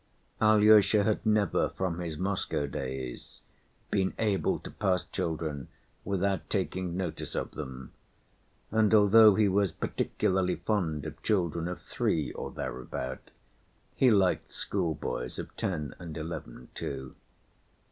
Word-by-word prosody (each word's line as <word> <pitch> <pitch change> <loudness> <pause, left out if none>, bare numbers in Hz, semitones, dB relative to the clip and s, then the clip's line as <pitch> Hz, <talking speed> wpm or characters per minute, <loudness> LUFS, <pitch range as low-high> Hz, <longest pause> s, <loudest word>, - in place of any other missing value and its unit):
Alyosha 110 -1 +6
had 110 +1 0
never 105 -4 +2
from 90 -2 -3
his 85 -3 -4
Moscow 95 -5 -1
days 65 -3 -6 0.5
been 95 -2 +1
able 105 -3 +1
to - - -10
pass 90 -3 0
children 80 -4 -3 0.4
without 100 0 -1
taking 90 -2 -2
notice 90 -4 -4
of - - -2
them, 65 -4 -7 0.8
and 110 0 +4
although 105 0 +7
he 110 -1 +4
was 100 -1 +2
particularly 90 +2 0
fond 85 -4 -1
of - - -7
children 85 -5 0
of 90 - -4
three 80 -3 -1
or - - -5
thereabout, 65 +1 -5 0.7
he 130 - +5
liked 100 -5 +2
schoolboys 80 -9 -3
of - - -7
ten 75 -6 -2
and 85 -3 -7
eleven 80 -6 -7
too. 65 -1 -5
90 Hz, 125 wpm, -29 LUFS, 75-100 Hz, 0.8 s, although